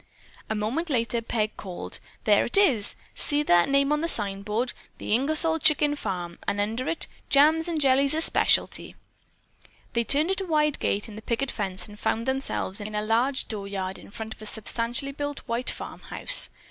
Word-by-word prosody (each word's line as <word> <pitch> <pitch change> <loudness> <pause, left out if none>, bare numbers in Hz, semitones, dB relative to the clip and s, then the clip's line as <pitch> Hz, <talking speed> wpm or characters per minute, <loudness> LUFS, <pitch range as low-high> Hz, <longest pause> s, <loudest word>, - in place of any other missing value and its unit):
A 220 - -1
moment 235 +11 -2
later 230 -3 0
Peg 220 -2 -2
called: 185 -3 -5 0.2
"There 205 -2 +4
it 240 - +3
is! 270 - +3 0.2
See 290 0 +1
the 175 -9 +4
name 275 +1 +2
on 300 0 +1
that 335 - 0
signboard, 210 0 0 0.2
'The - - -3
Ingersol 315 +6 +3
Chicken 295 -1 +3
Farm,' 180 -9 -5
and 205 - 0
under 225 +6 -2
it, 330 - 0 0.2
'Jams 310 +4 +4
and 335 -2 -1
jellies 275 +1 +4
a 320 - +2
specialty.'" - - +2 1.0
They 235 -1 +1
turned 300 +9 +2
in 385 - -1
at - - -3
a - - -3
wide 300 -2 +2
gate 205 +3 0
in 215 - -10
the - - -8
picket 245 +4 -2
fence 190 -4 -4
and 210 0 -13
found 225 +1 -1
themselves 265 -7 -1
in 210 +1 -6
a 210 - -1
large 240 +5 +1
dooryard 200 -3 -4
in - - -14
front 220 +1 -7
of - - -18
a 215 - -6
substantially 235 +6 0
built 290 +1 -4
white 235 +2 -2
farmhouse. - - 0
235 Hz, 185 wpm, -26 LUFS, 210-290 Hz, 1.0 s, There